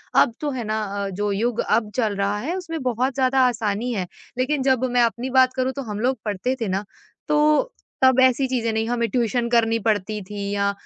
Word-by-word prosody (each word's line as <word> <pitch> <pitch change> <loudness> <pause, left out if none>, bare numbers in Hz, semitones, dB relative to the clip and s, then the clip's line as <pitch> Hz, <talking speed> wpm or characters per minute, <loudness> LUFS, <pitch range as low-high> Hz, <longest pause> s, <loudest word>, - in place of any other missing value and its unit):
अब 235 - +5
तो 295 - -1
है 255 -3 -4
ना 215 0 -2
अ, 200 -1 -3
जो 205 +2 -2
युग 230 +3 -1
अब 215 -1 +1
चल 220 -5 0
रहा 200 +1 0
है 315 +10 -3
उसमें 330 -4 -5
बहुत 255 +1 0
ज़्यादा 265 0 +2
आसानी 225 0 -1
है। 185 -5 -2 0.3
लेकिन 265 +3 0
जब 260 -2 +2
मैं 245 0 +3
अपनी 235 +2 -1
बात 260 0 +4
करूँ 260 0 0
तो 275 - -5
हम 210 -3 -5
लोग 255 +3 +1
पढ़ते 210 +5 -1
थे 225 - 0
ना 190 +2 -1 0.4
तो 300 +11 +3 0.3
तब 260 -1 +5
ऐसी 260 +1 +4
चीज़ें 240 -3 -1
नहीं, 220 0 -1
हमें 235 -1 0
ट्यूशन 235 +1 0
करनी 230 -1 +3
पड़ती 215 -1 -1
थी 200 +1 -5
या 200 0 +1
235 Hz, 215 wpm, -23 LUFS, 210-260 Hz, 0.4 s, अब